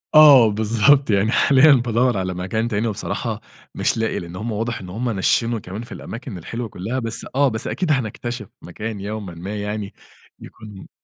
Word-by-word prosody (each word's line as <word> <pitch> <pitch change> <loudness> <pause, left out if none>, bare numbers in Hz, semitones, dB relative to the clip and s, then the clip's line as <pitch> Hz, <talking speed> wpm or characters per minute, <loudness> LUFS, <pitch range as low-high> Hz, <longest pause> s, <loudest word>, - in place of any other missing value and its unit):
آه، 140 -7 +9
بالضبط، 115 +6 +3
يعني 105 +2 +2
حاليًا 140 +2 +5
بادوّر 120 -2 +1
على 95 -1 -2
مكان 105 +6 -2
تاني، 110 0 -1
وبصراحة 105 - -3 0.3
مش 135 -3 +1
لاقي، 110 0 -1
لأن 85 +1 -9
هم 110 +4 -4
واضح 115 +3 -3
إن 90 - -9
هم 120 +6 -3
نشِّنوا 115 +3 +1
كمان 95 +4 -7
في - - -14
الأماكن 115 -4 -7
الحلوة 115 +7 -5
كلّها، 110 +9 -4
بس 115 -2 0
آه، 140 0 +4
بس 110 -3 -2
أكيد 175 -4 -1
هنكتشف 120 -3 -3
مكان 105 +4 -6
يومًا 100 -3 -6
ما 95 +5 -6
يعني 105 -1 -4 0.5
يكون 105 -3 -12
110 Hz, 175 wpm, -21 LUFS, 100-120 Hz, 0.5 s, آه